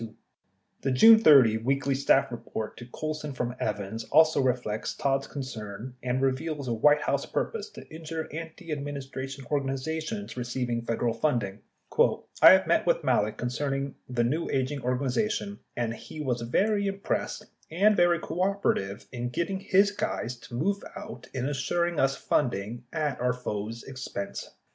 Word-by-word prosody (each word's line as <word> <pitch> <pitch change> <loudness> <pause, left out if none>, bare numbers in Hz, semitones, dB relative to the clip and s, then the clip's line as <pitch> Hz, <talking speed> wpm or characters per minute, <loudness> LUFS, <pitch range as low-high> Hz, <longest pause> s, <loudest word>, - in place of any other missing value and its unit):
428 115 -1 -15
The - - -1
June 225 0 +10
30 135 - +7
"Weekly 135 +3 0
Staff 135 +1 +3
Report" 110 -1 -5
to 120 - -9
Colson 150 +2 -4
from 125 -1 -2
Evans 105 +1 -3
also 160 0 +5
reflects 125 -4 -1
Todd's 135 -2 0
concern 120 -3 -6
and 125 +1 -1
reveals 140 +1 -1
a 120 - 0
White 150 +6 +4
House - - 0
purpose 435 -2 -2
to - - -12
injure 160 0 -5
antiadministration 145 -5 -6
organizations 155 +8 -2
receiving 120 -1 -2
Federal 115 0 -1
funding: 115 -6 -1 0.8
I - - +9
met - - +2
with - - +2
Malek 105 +1 +1
concerning 135 +2 -2 0.2
the 125 -2 +1
new 150 +8 0
aging 135 +1 -1
organization, 140 - -1 0.2
and 120 -1 -1
he 155 - -10
was 125 -5 -1
very 200 - +1
impressed 195 0 -2 0.2
and 200 +6 +4
very 175 -1 +4
cooperative 180 - -1
in 120 -1 -3
getting 170 +9 -2
his 195 +1 +3
guys 125 - -3
to 120 - -10
move 195 +10 0
out 120 +1 -8
in 130 -1 -3
assuring 170 +4 0
us 135 0 +3
funding 120 -2 -1
at 150 -5 -2
our 125 0 +2
foe's 115 -2 -5
expense. 130 -7 -6
135 Hz, 145 wpm, -28 LUFS, 120-160 Hz, 0.8 s, June